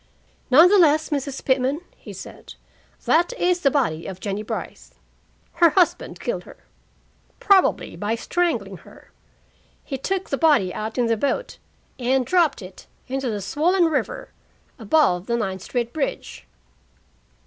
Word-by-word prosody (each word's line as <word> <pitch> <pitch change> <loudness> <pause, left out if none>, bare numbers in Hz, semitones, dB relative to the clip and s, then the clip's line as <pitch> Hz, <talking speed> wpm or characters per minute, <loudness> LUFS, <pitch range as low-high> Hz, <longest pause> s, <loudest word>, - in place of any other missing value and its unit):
"None 315 +7 +8
the 400 +2 +4
less, 310 -2 +3
Mrs. 280 -2 -3
Pitman," 260 +2 +1 0.2
he - - -12
said, - - -11 0.5
"that 345 +8 +2
is 360 -6 +1
the 275 - +4
body 235 - -1
of 190 -1 -7
Jennie 200 +1 -3
Brice; 215 - -7 0.7
her 340 - +8
husband 350 +2 0
killed - - -3
her, - - -14 0.8
probably 395 -2 +2
by 210 +2 -2
strangling 230 - -2
her; - - -18 0.7
he 270 -3 -5
took 385 +6 -3
the 275 - -1
body 285 - +3
out 220 +2 -5
in 245 - +2
the 230 0 +1
boat 285 - -2 0.4
and 255 +1 +1
dropped 335 - +1
it 185 0 -13 0.2
into 265 0 -2
the 210 -2 -3
swollen 335 - +1
river 320 -2 -2 0.5
above 210 - +2
the 235 -1 0
Ninth 190 -4 -3
Street 235 +3 -3
bridge." 300 -4 -4
270 Hz, 145 wpm, -22 LUFS, 220-330 Hz, 0.8 s, None